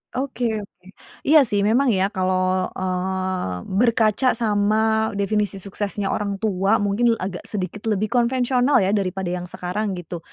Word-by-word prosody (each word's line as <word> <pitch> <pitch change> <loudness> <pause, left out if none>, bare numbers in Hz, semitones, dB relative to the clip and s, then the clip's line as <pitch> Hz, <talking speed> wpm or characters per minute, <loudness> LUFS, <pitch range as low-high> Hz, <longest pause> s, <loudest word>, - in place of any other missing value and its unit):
Oke 260 -1 -3 0.2
oke. 185 -3 -13 0.4
Iya 310 +2 +6
sih, 205 -1 0
memang 240 +7 +3
ya, 195 -3 +2
kalau, 185 0 +1
eee, 185 - -2 0.2
berkaca 230 0 +3
sama 220 0 +1
definisi 205 0 0
suksesnya 200 +1 -3
orang 200 -1 -2
tua, 195 0 +1
mungkin 230 +4 +2
agak 185 -4 -6
sedikit 205 +2 -4
lebih 215 0 0
konvensional 250 0 +2
ya, 190 - +1
daripada 190 -3 -1
yang 180 0 -4
sekarang 190 +3 -3
gitu. 175 -1 -7
200 Hz, 140 wpm, -22 LUFS, 185-220 Hz, 0.4 s, Iya